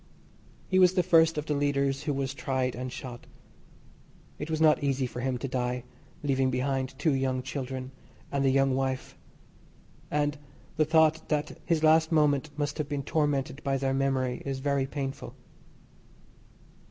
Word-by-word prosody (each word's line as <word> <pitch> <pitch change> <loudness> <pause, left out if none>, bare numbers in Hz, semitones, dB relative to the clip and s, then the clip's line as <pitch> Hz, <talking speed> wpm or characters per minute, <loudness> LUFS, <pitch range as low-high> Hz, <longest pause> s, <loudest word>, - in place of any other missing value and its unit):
He 185 - +3
was 185 0 +5
the 180 - +3
first 165 -2 +4
of 150 - -2
the 150 - -1
leaders 140 -1 0
who 145 - 0
was 135 -1 -2
tried 130 -2 -1
and 125 +1 -5
shot. 125 -2 -8 1.1
It 150 - -5
was 160 -1 -1
not 155 -2 +4
easy 135 -2 +1
for 125 - -6
him 130 0 -1
to 135 - -4
die 125 -1 -2 0.4
leaving 135 -2 +2
behind 130 0 -1
two 145 +2 +2
young 130 -1 0
children 130 -1 -5 0.4
and 140 -1 0
a 135 - +4
young 135 0 +3
wife, 130 -1 -2 0.9
and 145 0 0 0.4
the 155 -1 +3
thought 160 0 +3
that 150 -1 -1
his 160 -2 +1
last 160 +1 +5
moment 150 -2 +3
must 145 +1 -2
have 150 0 -2
been 145 -2 -2
tormented 145 -1 0
by 135 -1 +1
their 135 0 0
memory 135 -2 0
is 135 -1 -3
very 140 0 0
painful. 135 -1 -5
140 Hz, 165 wpm, -28 LUFS, 130-150 Hz, 1.1 s, was